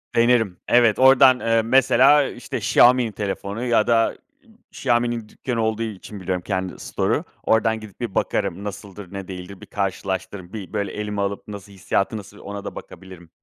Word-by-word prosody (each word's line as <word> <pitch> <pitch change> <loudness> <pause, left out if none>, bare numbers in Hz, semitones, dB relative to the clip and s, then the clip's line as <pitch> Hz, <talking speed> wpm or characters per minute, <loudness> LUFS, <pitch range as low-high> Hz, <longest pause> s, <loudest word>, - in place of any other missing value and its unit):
Denerim. 115 -5 +3
Evet, 120 -4 +4
oradan, 130 -1 +7
eee, 115 0 +2
mesela, 135 +4 +5
işte, 120 - -6
Xiaomi'nin 120 +1 +4
telefonu 100 +2 -4
ya 115 -3 +2
da, 115 -1 +4 0.4
ııı, 225 -4 -23
Xiaomi'nin 120 -3 -1
dükkânı 120 -3 -3
olduğu 110 0 -1
için 105 -1 -7
biliyorum, 95 -1 -2
kendi 95 -1 -3
store'u. - - -1 0.2
Oradan 110 0 +2
gidip 110 -3 -13
bir 120 -5 -5
bakarım. 100 -2 -1
Nasıldır, 100 -2 -8
ne 95 -2 -6
değildir? 95 +1 -9
Bir - - -10
karşılaştırırım, 95 -1 -4
bir, 105 -3 -8
böyle, 100 -2 -2
elime 105 -1 -4
alıp 100 0 -3
nasıl, 100 -1 -9
hissiyatı 100 +2 -1
nasıl 105 0 -11
ona 100 0 -7
da - - -6
bakabilirim 95 -3 -12
105 Hz, 165 wpm, -22 LUFS, 100-120 Hz, 0.4 s, oradan